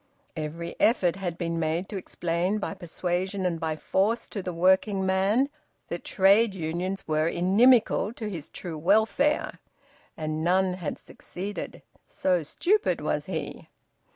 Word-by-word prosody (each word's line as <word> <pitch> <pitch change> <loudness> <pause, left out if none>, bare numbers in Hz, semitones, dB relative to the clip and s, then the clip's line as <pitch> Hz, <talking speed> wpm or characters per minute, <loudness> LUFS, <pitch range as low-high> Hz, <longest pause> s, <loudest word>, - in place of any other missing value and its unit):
Every 165 +2 -5
effort 185 -7 +3
had 175 -4 -4
been 170 -2 -2
made 165 +3 -1
to 210 - -6
explain 175 +1 -1
by 210 - -3
persuasion 180 +3 -3
and 170 -2 0
by 160 -1 -1
force 210 +8 0
to 200 - -4
the 180 - -4
working 190 +3 +2
man 195 +8 +2 0.4
that 170 - -4
trade 200 +2 +4
unions 180 +3 -3
were 155 0 +1
inimical 210 +6 +4
to 220 -2 -5
his 170 -7 -6
true 165 -4 -7
welfare, 220 - +2 0.6
and 155 0 -3
none 185 +2 +2
had 180 -4 -4
succeeded, 200 +3 -7 0.2
so 180 -2 +1
stupid 385 - +1
was - - -1
he. - - -5
185 Hz, 140 wpm, -27 LUFS, 170-200 Hz, 0.6 s, trade